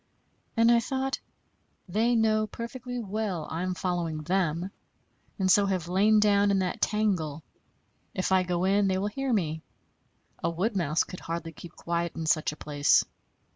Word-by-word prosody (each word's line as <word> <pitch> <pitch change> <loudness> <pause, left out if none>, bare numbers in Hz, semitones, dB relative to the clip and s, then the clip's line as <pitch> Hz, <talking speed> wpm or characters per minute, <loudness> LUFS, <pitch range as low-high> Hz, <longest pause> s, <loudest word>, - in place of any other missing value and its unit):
And 230 +1 +5
I 235 - +6
thought, 265 +2 -2 0.7
"They 225 +6 +2
know 215 -1 +2
perfectly 245 +3 -6
well 205 -7 -3
I 165 - -2
am 185 0 -2
following 170 -4 -2
them, 175 +1 0 0.7
and 190 -3 +2
so 200 +1 +5
have 185 -4 -1
lain 205 +4 +4
down 205 -1 +4
in 200 - +3
that 185 -1 -2
tangle. 175 -8 0 0.7
If 185 - -1
I 190 0 +5
go 180 -1 -1
in, 195 +1 +3
they 190 -1 +1
will 190 - -1
hear 270 +4 -2
me; 160 -8 0 0.8
a 165 - +2
wood 190 +7 -1
mouse 165 -4 +1
could 180 - -9
hardly 165 0 -5
keep 165 +1 -12
quiet 170 0 -2
in 165 - -4
such 155 -1 +2
a - - -9
place. 145 -1 +3
190 Hz, 170 wpm, -28 LUFS, 170-215 Hz, 0.8 s, I